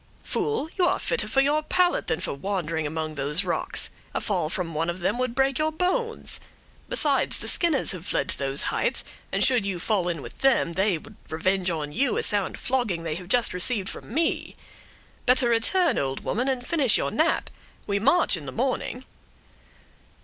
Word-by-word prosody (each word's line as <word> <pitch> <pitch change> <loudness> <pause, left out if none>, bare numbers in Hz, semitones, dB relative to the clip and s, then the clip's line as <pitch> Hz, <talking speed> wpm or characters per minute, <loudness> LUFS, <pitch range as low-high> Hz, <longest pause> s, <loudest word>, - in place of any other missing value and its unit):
"Fool, 440 -8 -1
you 355 - +4
are - - +2
fitter 485 - -1
for 270 - +3
your 290 +3 +2
pallet 355 +3 +2
than 160 - 0
for - - -1
wandering 165 -1 -2
among 155 +1 -3
those 150 +5 +1
rocks; 170 -3 0 0.2
a - - +1
fall 155 - -1
from 170 -1 -3
one 165 +2 -1
of 175 +1 -3
them 185 +7 -1
would 255 -2 -1
break 270 0 +2
your 310 0 +1
bones; 375 +8 -1 0.5
besides, 300 - +2
the - - -6
Skinners 330 -6 +2
have 185 -1 -6
fled - - +2
to - - -2
those 135 0 +1
heights, - - 0 0.3
and - - +1
should 250 -5 +4
you 195 -2 -2
fall 185 0 0
in 165 -5 -4
with - - -11
them, 265 -10 +2
they 190 0 +1
would 215 +6 -14
revenge 185 +4 0
on 155 -3 -3
you 250 - 0
a - - 0
sound 205 -3 +1
flogging 240 -10 0
they 165 -2 -2
have 175 +3 -7
just 240 +1 +3
received 195 +2 +1
from - - -8
me. 320 +6 -1 0.7
Better 250 -1 +4
return, 335 +11 +3
old 135 -1 -3
woman, 245 +6 -1
and 255 -2 -1
finish 280 -8 +2
your - - -1
nap; - - +1 0.3
we 200 0 0
march 280 - +4
in 150 -5 -8
the - - -4
morning." 255 - -2
210 Hz, 195 wpm, -25 LUFS, 170-270 Hz, 0.7 s, you